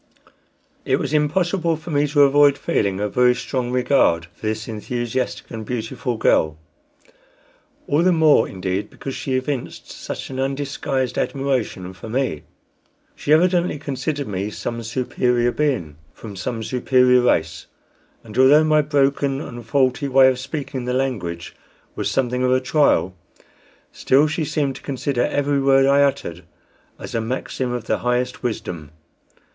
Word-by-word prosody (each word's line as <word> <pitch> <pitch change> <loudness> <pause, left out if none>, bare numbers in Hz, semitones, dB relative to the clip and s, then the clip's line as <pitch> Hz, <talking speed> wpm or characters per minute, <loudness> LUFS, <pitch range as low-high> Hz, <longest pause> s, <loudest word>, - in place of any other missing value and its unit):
It - - +1
was - - -3
impossible 170 +3 +1
for 160 +2 -9
me 145 0 +2
to 145 0 +4
avoid 140 0 +5
feeling 100 -2 -1
a 105 - 0
very 125 +3 +3
strong 125 -2 -3
regard 125 -9 +2
for 110 - -7
this 110 +1 -3
enthusiastic 120 +3 -4
and 110 -2 -6
beautiful 120 +1 -4
girl; 80 -7 +2 1.3
all 145 +3 +1
the 185 +1 +4
more, 160 -3 +4
indeed, 95 +1 -3
because 135 - -7
she 130 0 -3
evinced 130 0 -4
such - - -7
an 130 - -5
undisguised 135 -1 -2
admiration 130 -9 -2
for 95 +4 -10
me. 125 - -1 0.7
She 145 - -3
evidently 175 +1 +3
considered 140 0 -3
me 100 0 -3
some 115 +2 -5
superior 120 0 0
being, 120 - -1 0.2
from 105 -3 -9
some 115 +4 -4
superior 125 +1 +3
race; 80 -10 0 0.6
and 110 -2 -12
although 145 +4 +7
my 155 -1 +4
broken 140 -1 +1
and 120 -5 -8
faulty 130 +3 +1
way 135 0 +6
of 130 -1 -2
speaking 135 -2 -5
the 125 - -1
language 95 -11 -3 0.4
was - - -2
something 125 -1 0
of 125 - +2
a 130 - +4
trial, 130 - +2 0.8
still 140 +3 +3
she 160 +1 -2
seemed 140 -2 -1
to - - -14
consider 135 -2 -2
every 145 -1 0
word 135 0 +4
I 140 +1 +4
uttered 135 -11 -1 0.5
as - - -9
a 115 - 0
maxim 125 +2 -3
of 120 -2 -4
the - - 0
highest 125 +1 -1
wisdom. 85 - -5
130 Hz, 150 wpm, -21 LUFS, 115-140 Hz, 1.3 s, although